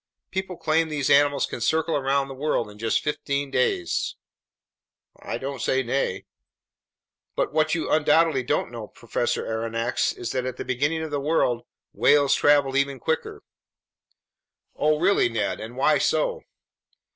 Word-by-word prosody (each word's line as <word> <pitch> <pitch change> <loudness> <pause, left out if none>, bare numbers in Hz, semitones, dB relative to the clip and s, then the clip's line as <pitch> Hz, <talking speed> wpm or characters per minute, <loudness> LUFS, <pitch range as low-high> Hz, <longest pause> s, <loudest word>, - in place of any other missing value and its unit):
People 190 -2 -4
claim 160 0 +1
these 145 -3 -1
animals 145 0 +4
can - - -7
circle 160 +6 +1
around 135 0 +1
the 135 - -7
world 130 -5 -1
in 105 - -16
just 115 0 0
fifteen 140 -1 -2
days." 90 -10 0 1.0
"I - - -4
don't 135 -2 -5
say 130 0 +1
nay." 120 -6 -2 1.1
"But - - -1
what 155 +1 +2
you 165 - -2
undoubtedly 155 -2 +3
don't 125 - -1
know, 115 -3 -7
Professor - - -2
Aronnax, 115 +2 -1
is 120 - -4
that 130 -1 -2
at 130 -1 -5
the - - -5
beginning 145 +6 -1
of 160 - -6
the 145 -1 -1
world, 135 -5 0 0.3
whales 145 -2 +4
traveled 145 -2 +3
even 140 -1 0
quicker." 160 +6 -3 1.3
"Oh 150 0 +2
really, 185 -7 +3
Ned! 110 -3 -2
And 115 +3 -8
why 150 +3 +3
so?" - - 0
140 Hz, 150 wpm, -24 LUFS, 125-155 Hz, 1.3 s, animals